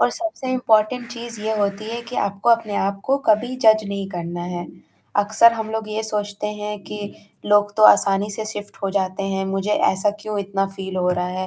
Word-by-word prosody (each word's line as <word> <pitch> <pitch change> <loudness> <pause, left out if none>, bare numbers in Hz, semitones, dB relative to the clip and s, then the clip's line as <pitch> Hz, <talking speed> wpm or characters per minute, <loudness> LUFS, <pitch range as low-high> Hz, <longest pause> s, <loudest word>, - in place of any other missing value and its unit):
और 245 - +4
सबसे 320 -5 -4
इम्पोर्टेंट 240 0 +2
चीज़ 235 -2 -7
ये 220 +1 -1
होती 200 +1 -1
है 235 +1 -4
कि 250 - -6
आपको 200 +3 0
अपने 225 -3 +2
आप 195 0 -1
को 270 - +2
कभी 230 +4 +3
जज 215 0 +6
नहीं 200 -1 -4
करना 175 -1 -5
है। 175 0 -4 0.5
अक्सर 215 +3 +5
हम 220 -1 -4
लोग 220 -1 -3
ये 215 +1 -2
सोचते 210 -1 -3
हैं 210 0 -5
कि, 210 - -7 0.5
लोग 205 0 +4
तो 215 - +2
आसानी 200 +1 +4
से 215 +2 -4
शिफ्ट 205 -1 -7
हो 195 - 0
जाते 190 0 -1
हैं, 195 0 -1
मुझे 195 +1 -2
ऐसा 205 0 +2
क्यों 210 0 -4
इतना 195 0 -1
फील 190 -1 -6
हो 180 -1 +1
रहा 180 0 0
है, 185 +1 -3
205 Hz, 210 wpm, -21 LUFS, 195-220 Hz, 0.5 s, जज